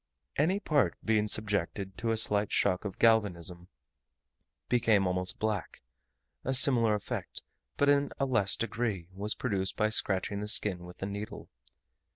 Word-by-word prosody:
Any 180 +7 +1
part, 150 -8 +1
being 110 -1 +2
subjected 100 -2 -1
to 115 - -2
a 115 - +1
slight 105 -2 +3
shock 95 0 +1
of 95 -2 -5
galvanism, 90 -6 +1 1.0
became 115 -5 +3
almost 90 0 -2
black: 105 - -3 0.6
a 130 - +1
similar 120 -5 +3
effect, 105 - -6 0.3
but 145 - +2
in 145 0 +3
a 135 - +2
less 110 -7 +1
degree, 105 -5 -3
was 105 +3 -2
produced 95 -6 -2
by 110 - +2
scratching 100 -1 +1
the 105 - -4
skin 95 -4 +3
with 90 +2 -10
a - - -1
needle. 100 +1 -7
105 Hz, 150 wpm, -30 LUFS, 95-115 Hz, 1.0 s, slight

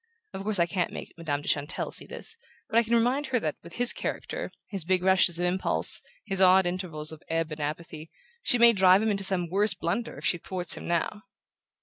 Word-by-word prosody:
Of 190 - -6
course 210 +1 0
I 170 - +3
can't 180 0 -2
make - - -8
Madame 145 -4 -3
de - - -10
Chantelle 145 0 -1
see - - +2
this; 450 - -1 0.3
but 230 - +3
I - - +5
can 235 +1 0
remind 250 +5 +1
her 255 -2 0
that, 155 -7 -3
with 170 - -13
his 245 0 +4
character - - -5 0.2
his 195 -4 -1
big 180 +1 0
rushes 185 -2 +4
of 175 - 0
impulse, 180 +1 +1 0.2
his 195 0 0
odd 185 0 +6
intervals 175 -4 -3
of 160 - -11
ebb 165 -1 -1
and 155 - -6
apathy 155 +1 -5 0.3
she 245 - +3
may 235 0 +7
drive 190 0 +5
him 220 - +1
into 195 -1 -1
some 190 -2 +2
worse 205 +3 +1
blunder 235 0 -3
if - - -8
she 175 - +1
thwarts 180 0 0
him - - -8
now." 175 +5 -1
185 Hz, 225 wpm, -27 LUFS, 165-210 Hz, 0.3 s, may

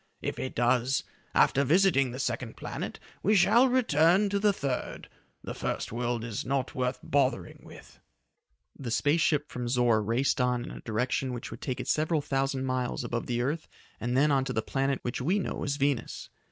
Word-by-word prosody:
If - - -3
it 130 - -4
does, 120 +2 +2 0.3
after 140 - +4
visiting 150 -3 +3
the 125 - -6
second 125 -3 -3
planet, - - -5 0.2
we 210 +3 +3
shall 235 +6 +6
then 255 - +1
return 190 - +4
to 200 0 0
the 205 0 +4
third. 140 -9 -4 0.4
The - - -5
first - - -3
world 120 0 -2
is 115 -3 -4
not 135 -1 -1
worth 125 0 -1
bothering 140 0 0
with." - - -14 0.8
The 130 -4 -6
space 145 +7 +2
ship 150 -2 +1
from 125 -1 -4
Zor 120 -3 +3
raced 120 +5 +1
on 125 -1 0
in - - -8
a - - -9
direction 125 +3 -1
which 120 - -6
would 115 - -9
take 130 -2 -3
it - - -5
several 155 -1 +1
thousand 135 -1 -1
miles 130 -1 -2
above 120 -1 -3
the 120 0 0
earth 155 +5 -2 0.3
and 120 +2 -1
then 145 +2 +4
on 135 -1 +3
to - - -3
the 110 - -1
planet 135 +2 0
which 120 - -3
we 175 +10 +1
know 200 - -3
as 140 -1 -1
Venus. 140 -3 -2
135 Hz, 195 wpm, -28 LUFS, 120-150 Hz, 0.8 s, shall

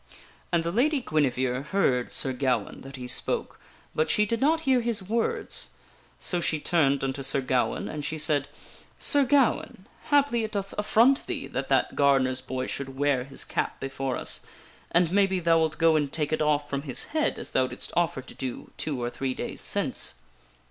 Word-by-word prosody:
And 170 -2 +2
the 170 - -1
Lady 275 - +2
Guinevere 130 - 0
heard 140 -6 +1
Sir 130 - -1
Gawaine 125 -5 -1
that 135 0 -9
he 125 -1 -7
spoke, 125 - 0 0.3
but 155 +1 +1
she 210 +6 +3
did 230 +3 -2
not 320 +4 +3
hear 265 -5 +3
his 230 -3 -1
words. 225 +4 -1 0.5
So 175 - 0
she 155 -2 +1
turned 145 -4 +2
unto 135 +1 -2
Sir 135 +1 0
Gawaine, 130 -1 0
and 150 -1 -5
she 155 +2 -2
said: 145 -2 +2 0.3
" - - -24
Sir 285 -1 +4
Gawaine, 260 -7 +2 0.2
haply 280 -6 +3
it 220 - -4
doth 200 -1 -3
affront 230 +6 +3
thee - - -3
that - - -4
that - - +2
gardener's 135 -2 +3
boy 130 0 -3
should 135 -1 -5
wear 140 -3 +1
his 135 0 -4
cap - - -2
before 135 -1 -3
us, - - -2 0.5
and 170 -1 +3
maybe 195 -1 +3
thou 165 -1 +4
wilt 160 -1 0
go 165 0 +4
and 145 -3 +1
take 150 -1 -1
it 155 - 0
off 150 -1 +2
from 140 -1 -2
his 140 -4 -2
head 310 -1 +1
as - - -6
thou 130 -1 +2
didst - - -7
offer 170 -6 +1
to - - -11
do 130 -2 -6
two 145 -5 -2
or 120 0 -2
three 130 0 -3
days - - -4
since." - - -2
150 Hz, 195 wpm, -27 LUFS, 135-200 Hz, 0.5 s, Sir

